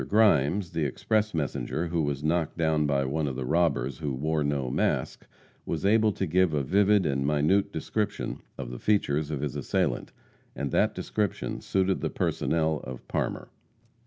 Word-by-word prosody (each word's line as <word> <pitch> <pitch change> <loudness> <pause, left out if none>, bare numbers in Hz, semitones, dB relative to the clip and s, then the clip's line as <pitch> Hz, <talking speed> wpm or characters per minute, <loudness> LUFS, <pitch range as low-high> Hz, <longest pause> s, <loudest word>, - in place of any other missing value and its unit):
Grimes, 100 -4 +3
the 80 - -1
express 110 - 0
messenger 80 +2 -2
who 85 -1 0
was 70 -1 -2
knocked 80 +1 0
down 80 -2 +2
by 70 -2 +1
one 75 +3 -1
of 65 - -3
the 65 0 -3
robbers 70 -5 +1
who 70 -3 -2
wore 75 +3 0
no 70 -3 -1
mask, - - -1 0.4
was 80 +3 -3
able 110 +1 +4
to - - -2
give 90 -1 +2
a 70 - +1
vivid 100 +5 +3
and 70 -2 0
minute 75 +8 +2
description 105 0 -3 0.2
of 60 -3 -5
the 60 - -7
features 75 -8 +1
of 75 -3 -3
his 75 -4 -3
assailant, - - -1 0.4
and 70 -2 -3
that - - +2
description 105 -4 -2
suited 95 0 0
the - - -1
personnel 80 -2 0
of 65 -1 -8
Parmer. - - -2
80 Hz, 170 wpm, -27 LUFS, 70-95 Hz, 0.4 s, able